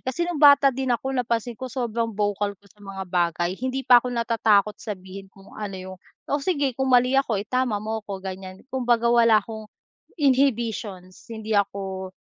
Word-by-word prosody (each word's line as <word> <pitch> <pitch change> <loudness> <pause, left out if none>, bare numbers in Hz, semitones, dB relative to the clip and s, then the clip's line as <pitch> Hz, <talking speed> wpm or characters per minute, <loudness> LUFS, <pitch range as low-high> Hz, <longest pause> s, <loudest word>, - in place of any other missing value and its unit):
Kasi 265 +7 -1
no'ng 345 -4 -3
bata 285 -2 +7
din 265 +1 -3
ako, 265 +3 -2
napansin 235 -2 -2
ko, 260 0 -5
sobrang 230 -2 -2
vocal 205 -1 -1
ko 200 - -34
sa 205 +2 -26
mga 195 -1 -7
bagay, 175 0 0
hindi 260 +1 -3
pa 245 -1 +7
ako 250 - -5
natatakot 220 -3 +2
sabihin 195 -2 -8
kung 195 0 -18
ano 205 -3 -5
'yong 185 0 -8 0.3
o 285 - +1
sige, 285 -7 0
kung 265 -1 0
mali 250 +2 +4
ako, 235 -7 +1
itama 240 -1 -1
mo 220 +1 -3
ako, 195 -2 -6
ganyan. 190 0 -8
Kumbaga, 240 -3 +1
wala 230 -2 +5
akong 220 +1 -9 0.6
inhibitions. 230 -9 0
Hindi 220 -1 -2
ako 190 -2 -2
220 Hz, 175 wpm, -24 LUFS, 195-255 Hz, 0.6 s, bata